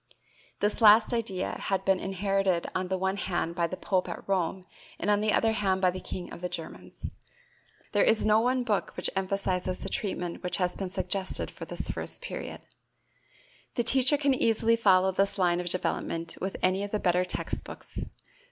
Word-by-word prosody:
This 210 +3 +1
last 215 +2 +7
idea 210 -6 -2
had 195 -1 -1
been 190 -1 +3
inherited 195 -2 0
on 185 0 -1
the 190 +1 -1
one 190 +1 -1
hand 175 -3 -2
by 170 0 0
the 185 - -6
pope 185 -2 0
at - - -7
Rome 190 -1 0 0.3
and 205 - 0
on 205 0 +3
the 215 0 +2
other 225 +1 +2 0.2
by 185 -1 +3
the 185 - -6
king 180 -1 -7
of - - -9
the 180 - -2
Germans. 165 -2 -7 0.8
There 205 - +3
is 220 - +3
no 215 0 +5
one 250 +1 +1
book 215 -4 -1
which - - -2
emphasizes 185 -1 -1
the 195 - -4
treatment 180 -4 -3
which 180 - -2
has 180 -2 0
been 190 -2 -4
suggested 190 0 -1
for - - -8
this - - -3
first - - -4
period. - - -6 1.1
The 240 - +1
teacher 260 +4 +6
can 280 -1 +2
easily 230 -2 +3
follow 190 -4 +4
this 195 +2 0
line 175 -2 +2
of 175 0 -3
development 165 -2 -2
with 190 +1 -3
any 185 +2 +2
of 205 - -4
the 210 - -1
better 180 -1 +2
text 180 - -3
books. - - -7
190 Hz, 190 wpm, -28 LUFS, 180-210 Hz, 1.1 s, last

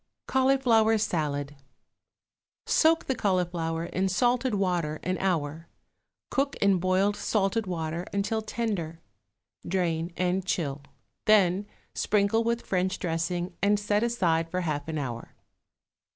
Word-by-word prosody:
=Cauliflower 255 -5 +3
Salad.= 150 -8 -2 1.1
Soak 325 0 +3
the 265 - 0
cauliflower 175 -6 -1
in 185 +2 -1
salted 245 +4 +1
water 175 -6 0
an 185 +1 -1
hour; 165 -3 -1 0.6
cook 275 +1 0
in 200 -2 +3
boiling 185 +3 +2
salted 205 0 0
water 165 0 -3
until 205 +2 -1
tender; 205 -8 -3 0.6
drain 170 -2 -1
and 180 +1 0
chill, 150 -6 -2 0.4
then 200 -2 +4 0.3
sprinkle 210 +2 +2
with 235 +1 -1
French 185 0 0
dressing 175 +1 -2
and 205 +1 +3
set 205 0 +1
aside 170 -9 +1
for 180 +2 -2
half 150 -4 -2
an 160 -1 -3
hour. 120 -5 -5
185 Hz, 120 wpm, -27 LUFS, 165-210 Hz, 1.1 s, then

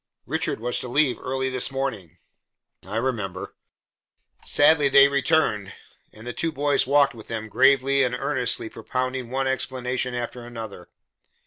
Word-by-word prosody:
"Richard - - -1
was 120 +2 -1
to - - -5
leave 130 +1 +1
early 130 0 -2
this 130 +1 +1
morning." 110 - -4 0.7
"I 105 - -6
remember." 110 -6 -3 0.9
Sadly 145 -1 +4
they 140 +1 +7
returned, 140 -8 +1 0.4
and 110 +2 -13
the 120 - -5
two 165 - -1
boys 145 -3 +1
walked 140 0 +4
with 110 -3 -12
them, 110 -1 -5
gravely 135 +3 +3
and 125 -2 +1
earnestly 130 -4 0
propounding 130 +2 -4
one 135 +1 -1
explanation 130 -1 -2
after 120 0 -5
another. 115 -6 -9
130 Hz, 140 wpm, -24 LUFS, 115-135 Hz, 0.9 s, they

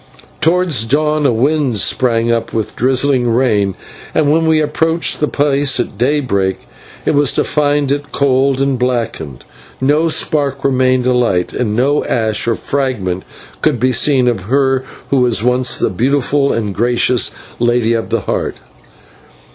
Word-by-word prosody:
Towards 165 -6 +2
dawn 150 +3 +1
a - - +2
wind 135 +1 0
sprang 115 +1 +1
up 115 -1 -2
with 110 -2 -3
drizzling 130 0 +1
rain, 105 -6 +1 0.4
and 145 -2 +2
when 160 +1 +2
we 160 -1 +3
approached 160 +2 0
the 150 - +1
place 140 -2 +1
at 120 - -3
daybreak 120 -8 0 0.5
it - - +1
was 145 -2 +2
to - - +1
find 145 -2 0
it 145 0 -3
cold 135 -1 +1
and 135 -2 0
blackened. 115 - -3 0.4
No 150 +5 +2
spark 145 -4 -1
remained 130 -1 +2
alight, 120 -8 +1
and 105 -4 -2
no 140 +5 +1
ash 110 -1 -1
or 115 - +1
fragment 110 -12 -2 0.4
could 150 -6 +1
be 130 +2 +2
seen 125 +1 +2
of 110 -7 -1
her 135 -1 +1 0.3
who 140 - +3
was 120 -4 +2
once 125 0 +1
the - - 0
beautiful 140 +6 +1
and 105 -3 -2
gracious 120 +2 +1 0.3
Lady 120 -1 +1
of 115 -1 -2
the - - 0
Heart. - - -3
130 Hz, 155 wpm, -15 LUFS, 115-145 Hz, 0.5 s, we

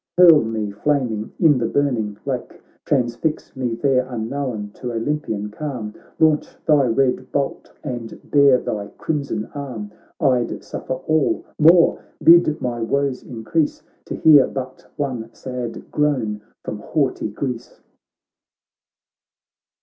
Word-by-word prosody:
hurl 170 -4 +8
me 110 -2 -3
flaming 115 -1 -1
in 150 -6 +5
the 115 - 0
burning 115 -7 0
lake, 130 -3 -4 0.3
Transfix 130 +3 -1
me 125 -3 -2
there 130 0 +2
unknown 115 -2 -3
to 125 - -5
Olympian 115 -4 -2
calm, 120 -5 -5 0.2
Launch 155 -2 +2
thy 150 -4 +4
red 125 +2 +1
bolt, 140 -1 -2
and 120 -6 -6
bare 140 -3 +6
thy 105 -4 -4
crimson 140 -8 -2
arm, 125 -8 -6 0.3
I'd 125 -3 +1
suffer 130 - -4
all 155 +3 0
— - - -37
more 170 -1 +4
— - - -17
bid 170 -2 +5
my 120 -2 -3
woes 140 +2 0
in 115 -3 -9
crease. 155 +6 0 0.2
To - - -5
hear 150 -4 +6
but 130 -1 -7
one 125 -6 -3
sad 125 -3 -6
groan 125 -9 0 0.2
from 105 - -5
haughty 130 -1 -1
Greece.' 125 +2 -5
130 Hz, 130 wpm, -21 LUFS, 115-145 Hz, 0.3 s, hurl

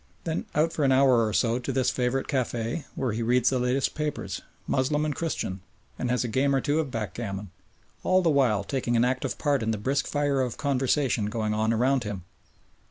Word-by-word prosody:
Then 160 -1 -3
out 160 +2 +2
for 150 - -1
an 135 - +4
hour 130 -4 +5
or - - -2
so 115 +2 +1
to 125 +2 -3
this 130 -1 +1
favourite 125 +1 0
café, 125 +1 -2
where 130 -3 -1
he 110 +2 -3
reads 125 +2 +3
the 130 - +1
latest 125 +2 +1
papers 150 -1 -3 0.2
Moslem 150 +3 +1
and 150 -2 -2
Christian 130 - -3 0.4
and 125 - -1
has 125 +1 +1
a - - -2
game 135 +4 +2
or - - +3
two 145 +3 0
of 155 -4 -1
backgammon, 105 -4 -4 0.5
all 185 0 +3
the 165 - +3
while 125 -8 +3
taking 120 +2 -1
an 115 - +4
active 125 0 -1
part 145 -4 +1
in 110 - -1
the 110 - 0
brisk 135 +7 0
fire 145 -2 +1
of 125 -3 -2
conversation 135 -5 +1
going 110 -1 -1
on 110 +1 +1
around 125 +3 +2
him. 100 -4 -5
130 Hz, 210 wpm, -27 LUFS, 115-140 Hz, 0.5 s, hour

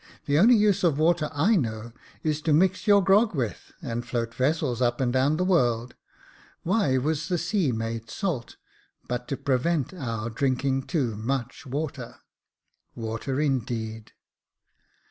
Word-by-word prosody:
The 145 +1 +2
only 235 +7 +7
use 205 -3 +3
of 160 -5 +3
water 155 -1 +2
I 160 +9 +3
know 115 - -2 0.3
is 155 -1 0
to 155 -1 +1
mix 185 +5 +2
your 200 -1 +6
grog 200 +2 +4
with, 120 -9 -3
and 120 0 -3
float 115 -2 -3
vessels 130 -2 0
up 120 -1 +1
and 125 -2 0
down 135 +4 +2
the 180 - 0
world. 120 -9 +1 0.7
Why 170 -8 +2
was 155 +4 -1
the 180 -2 0
sea 170 -3 0
made 115 0 -4
salt, 165 - -3 0.5
but 125 0 -3
to 140 - -3
prevent 140 +4 0
our 115 -8 -4
drinking 135 +2 0
too 130 - -1
much 125 +4 -4
water. 140 -2 -4 0.8
Water, 115 +4 -3
indeed 115 -6 -2
135 Hz, 145 wpm, -26 LUFS, 120-170 Hz, 0.8 s, only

